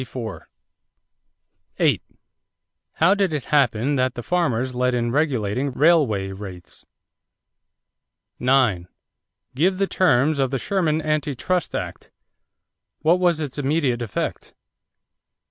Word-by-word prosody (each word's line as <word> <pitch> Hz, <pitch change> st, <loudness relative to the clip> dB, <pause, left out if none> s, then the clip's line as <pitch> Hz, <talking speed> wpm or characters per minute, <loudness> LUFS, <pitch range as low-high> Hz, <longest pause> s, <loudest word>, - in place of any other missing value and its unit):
How 115 Hz, -8 st, -7 dB, 2.7 s
did 195 Hz, -5 st, 0 dB
it 145 Hz, -, -3 dB
happen 140 Hz, -1 st, +2 dB
that 130 Hz, -1 st, 0 dB
the 120 Hz, -, -6 dB
farmers 130 Hz, -8 st, 0 dB
led 125 Hz, 0 st, +1 dB
in 120 Hz, -1 st, -1 dB
regulating 130 Hz, -3 st, 0 dB
railway 130 Hz, -, +2 dB
rates? 95 Hz, -2 st, -9 dB, 1.5 s
9. 125 Hz, -9 st, +2 dB, 0.7 s
Give 180 Hz, +8 st, +1 dB
the 195 Hz, -, +2 dB
terms 150 Hz, -6 st, +2 dB
of 135 Hz, -1 st, +2 dB
the 135 Hz, -, -1 dB
Sherman 160 Hz, -1 st, 0 dB
Anti 150 Hz, -2 st, -1 dB
Trust 170 Hz, +8 st, -1 dB
Act. -, -, -6 dB, 0.9 s
What 170 Hz, +3 st, +4 dB
was 175 Hz, -3 st, +2 dB
its 145 Hz, -2 st, -4 dB
immediate 140 Hz, -4 st, 0 dB
effect? 115 Hz, -4 st, -4 dB
135 Hz, 105 wpm, -22 LUFS, 120-155 Hz, 2.7 s, What